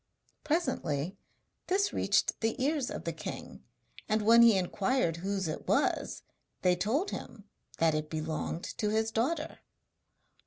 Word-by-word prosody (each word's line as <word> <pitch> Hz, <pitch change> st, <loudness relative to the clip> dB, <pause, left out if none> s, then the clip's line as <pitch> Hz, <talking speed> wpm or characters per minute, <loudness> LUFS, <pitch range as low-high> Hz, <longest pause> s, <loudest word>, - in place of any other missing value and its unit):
Presently 190 Hz, -, -1 dB, 0.5 s
this 400 Hz, +2 st, +1 dB
reached -, -, +1 dB
the 225 Hz, +3 st, 0 dB
ears 275 Hz, 0 st, +1 dB
of -, -, -5 dB
the -, -, -3 dB
king, -, -, -7 dB, 0.5 s
and 215 Hz, 0 st, +2 dB
when 230 Hz, +2 st, +7 dB
he 230 Hz, -4 st, +7 dB
inquired 190 Hz, 0 st, 0 dB
whose 195 Hz, +1 st, -2 dB
it 155 Hz, -, -5 dB
was -, -, +1 dB, 0.4 s
they 180 Hz, -1 st, +4 dB
told 265 Hz, -, 0 dB
him 210 Hz, -, -7 dB, 0.3 s
that 165 Hz, -1 st, +3 dB
it 155 Hz, 0 st, -2 dB
belonged 160 Hz, +2 st, -3 dB, 0.2 s
to 210 Hz, -, +1 dB
his 220 Hz, +1 st, +1 dB
daughter. 300 Hz, +8 st, -1 dB
215 Hz, 140 wpm, -31 LUFS, 170-260 Hz, 0.5 s, when